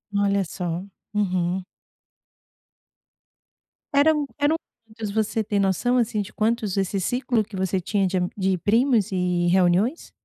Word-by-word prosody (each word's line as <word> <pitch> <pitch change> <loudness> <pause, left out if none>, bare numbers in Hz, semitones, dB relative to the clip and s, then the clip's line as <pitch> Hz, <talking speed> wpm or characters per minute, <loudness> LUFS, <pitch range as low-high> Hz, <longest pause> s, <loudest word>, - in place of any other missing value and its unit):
Olha 200 -1 +2
só, 175 0 -4 0.3
uhum. 185 -3 0 2.3
Eram 300 +1 +4
eram 290 +2 +2 0.3
quantos, 220 -1 -6
você 220 +1 0
tem 205 0 -1
noção, 200 +6 +2
assim, 220 -3 +1
de 200 - -8
quantos 220 -2 0
desse 195 0 0
ciclo 245 +2 0
que 205 0 -11
você 190 0 0
tinha 195 +2 0
de 185 +1 -1
a 180 -1 +1
de 190 -1 +1
primos 225 +2 +2
e 180 -2 0
reuniões? 185 - +2
200 Hz, 135 wpm, -24 LUFS, 185-225 Hz, 2.3 s, Eram